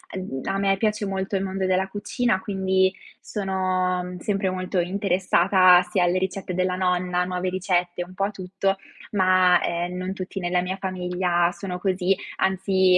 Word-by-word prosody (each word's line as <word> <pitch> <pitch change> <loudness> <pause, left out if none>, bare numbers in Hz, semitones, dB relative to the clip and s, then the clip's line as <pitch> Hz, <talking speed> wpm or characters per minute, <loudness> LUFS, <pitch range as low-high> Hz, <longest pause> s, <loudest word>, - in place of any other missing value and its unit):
Ehm, 185 -8 -5
a 195 - -1
me 195 0 +2
piace 210 0 0
molto 195 +1 -2
il 195 - 0
mondo 190 0 -2
della 185 +1 +1
cucina, 205 +1 -1
quindi, 190 -1 +1 0.3
sono, 185 -2 -1
mhmm, 180 0 -7
sempre 195 0 -1
molto 185 0 -2
interessata 185 0 +4
sia 180 0 +2
alle 175 +1 +2
ricette 190 0 -3
della 185 0 0
nonna, 180 -1 0
nuove 180 0 -2
ricette, 180 -1 -1
un 180 +1 -13
po' 195 +1 0
a 205 - -3
tutto 195 0 -2 0.3
ma 185 -2 +4
,ehm, 175 +1 -2
non 185 +1 -3
tutti 190 +1 -6
nella 180 0 0
mia 180 +1 -3
famiglia 180 -2 0
sono 180 +1 -6
così, 190 0 +1 0.2
anzi 190 -1 +3
185 Hz, 165 wpm, -24 LUFS, 180-195 Hz, 0.3 s, interessata